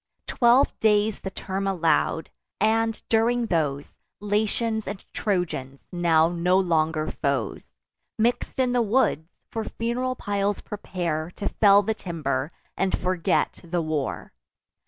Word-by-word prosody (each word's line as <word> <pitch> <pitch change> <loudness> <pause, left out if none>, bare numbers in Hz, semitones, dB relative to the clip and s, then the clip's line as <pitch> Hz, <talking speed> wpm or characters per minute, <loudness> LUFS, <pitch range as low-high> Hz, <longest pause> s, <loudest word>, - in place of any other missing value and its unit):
Twelve 245 +3 +4
days 210 -1 +2
the 190 - -5
term 195 +1 -4
allow'd: 165 -3 +1 0.3
and, 225 +1 +2
during 235 +2 +2
those, 150 -7 -1 0.3
Latians 220 +2 -1
and 200 0 -6
Trojans, 160 -9 -2
now 165 -2 +3
no 175 +2 +2
longer 160 -4 +1
foes, 140 -7 -2 0.5
Mix'd 240 +4 0
in 255 -1 +2
the 245 -1 +2
woods, 210 - +1 0.2
for 225 -1 -2
fun'ral 245 +4 -2
piles 200 0 -1
prepare 170 -6 -3
To 205 - -3
fell 200 -1 +5
the 220 +3 0
timber, 155 -7 -3 0.2
and 195 -1 0
forget 180 0 0
the 170 0 -2
war. 155 - -3
195 Hz, 125 wpm, -25 LUFS, 160-220 Hz, 0.5 s, fell